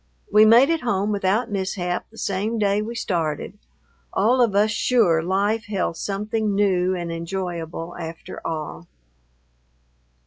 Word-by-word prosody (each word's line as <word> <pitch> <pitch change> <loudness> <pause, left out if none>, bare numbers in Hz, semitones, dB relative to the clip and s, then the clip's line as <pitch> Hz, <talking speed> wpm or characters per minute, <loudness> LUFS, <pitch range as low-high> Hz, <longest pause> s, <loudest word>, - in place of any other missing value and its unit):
We 215 +1 +8
made 240 +7 +6
it 330 - 0
home 205 -3 0
without 205 +3 0
mishap 185 -2 -2
the 225 - -18
same 205 +4 -1
day 205 -1 +2
we 230 +2 -5
started, 165 -9 -2 0.5
all 250 +4 +3
of 225 -5 +2
us 210 +2 +3
sure 210 -7 +3
life 200 +5 0
held 195 -5 -2
something 210 +2 -2
new 185 -2 +2
and 170 -1 -4
enjoyable 170 -1 -5
after 165 -1 -8
all. 150 - -5
195 Hz, 135 wpm, -23 LUFS, 175-215 Hz, 0.5 s, We